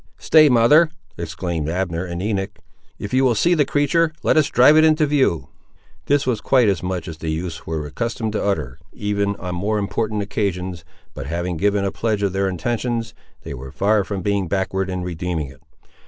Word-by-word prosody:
"Stay, 155 -2 +5
mother," 140 +7 +5 0.3
exclaimed 85 -1 -4
Abner 90 0 -2
and 85 0 -5
Enoch; 100 -3 -2 0.4
"if 100 - -7
you 130 +1 +3
will 125 -3 +3
see 170 +12 +3
the 150 -4 +3
creatur', 150 +4 +2
let - - +3
us 155 -3 +4
drive 130 +5 +6
it 155 - +6
into 155 -1 +4
view." 140 - +1 0.6
This 145 0 +2
was 120 -5 -1
quite 125 -2 +3
as 100 -3 +1
much 90 -2 -3
as 80 -2 -8
the 80 - -4
youths 80 0 -4
were 80 -2 -3
accustomed 110 - -3
to - - -1
utter, 80 -9 -2
even 100 -1 -1
on 90 -2 -5
more 100 +5 -1
important 105 +1 -1
occasions, 95 -4 -3 0.3
but - - -7
having 85 +2 -2
given 100 +3 +1
a 100 - -1
pledge 110 -2 -1
of 100 -2 0
their 95 0 0
intentions, 115 +5 -2 0.3
they - - -6
were 65 0 -8
far 105 +4 +2
from 95 -2 -5
being 100 -2 0
backward 95 +1 -1
in 90 -1 -3
redeeming 85 -4 -3
it. 65 +2 -16
100 Hz, 195 wpm, -21 LUFS, 85-115 Hz, 0.6 s, drive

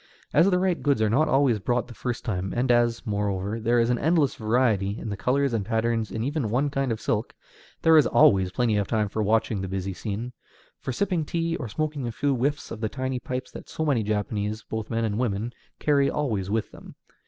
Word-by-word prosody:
As 165 +6 +5
the 180 - +3
right 180 -1 0
goods 140 -5 +2
are 105 - +2
not 150 +7 +3
always 135 -5 +3
brought 120 +3 0
the 120 - -10
first 120 +1 -4
time, 95 -4 -2
and 125 +1 +2
as, 120 0 +2
moreover, 100 0 -1
there 120 +2 +2
is 115 +1 +2
an 120 - 0
endless 155 -3 +2
variety 110 -3 +1
in - - -5
the 100 - -3
colors 135 +5 +1
and 110 -3 0
patterns 115 +1 0
in 110 - -3
even 140 -3 -1
one 135 +6 +1
kind 135 -2 -1
of 110 - -2
silk, - - -2 0.5
there 160 0 +6
is 150 -5 +6
always 95 -5 +4
plenty 115 0 +1
of 100 -2 0
time 110 -3 0
for 110 - -2
watching 110 -1 +1
the 95 - -3
busy 95 0 -3
scene, 110 +6 -5 0.5
for - - -4
sipping 180 +4 0
tea, 165 +2 -1
or 125 - -5
smoking 150 +1 -2
a - - -3
few 140 +5 0
whiffs 140 +4 -1
from 110 - -6
the 110 -1 -1
tiny 130 0 -3
pipes 125 +1 -5
that - - -10
so 160 - -3
many 135 -7 +2
Japanese, 105 0 -2
both 110 -1 -5
men 115 0 0
and 105 0 -2
women, 115 -1 -1 0.2
carry 140 -2 +2
always 110 -11 -1
with 110 +1 -1
them. - - -13
120 Hz, 225 wpm, -26 LUFS, 105-135 Hz, 0.5 s, there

